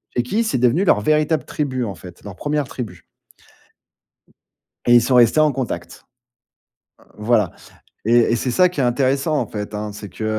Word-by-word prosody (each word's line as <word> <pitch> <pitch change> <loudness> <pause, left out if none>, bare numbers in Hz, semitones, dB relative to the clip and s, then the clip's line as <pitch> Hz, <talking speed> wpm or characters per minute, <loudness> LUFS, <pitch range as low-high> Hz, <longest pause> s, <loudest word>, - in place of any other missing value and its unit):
chez 120 - +2
qui, 215 - 0
c'est 220 - -1
devenu 125 +9 +2
leur 140 - +4
véritable 155 +4 +1
tribu 130 -4 -3
en 100 - -5
fait, 90 +1 -13
leur 100 -3 -9
1ère 145 +5 -2
tribu. 105 -10 -8 1.8
Et 120 - +6
ils 120 - +7
sont 125 +2 +1
restés 120 +4 +5
en 155 -1 +4
contact. 130 -3 -5 0.9
Heu, - - -21
voilà. 105 -3 +1 0.5
Et 115 - +1 0.2
et 120 - +2
c'est 125 - -2
ça 180 +8 +4
qui 175 -5 -5
est - - +3
intéressant, 135 +4 +1
en - - -1
fait, 105 0 -6
hein. 105 0 -4
C'est 105 0 -9
que, 95 +4 -7
125 Hz, 185 wpm, -20 LUFS, 105-150 Hz, 1.8 s, ils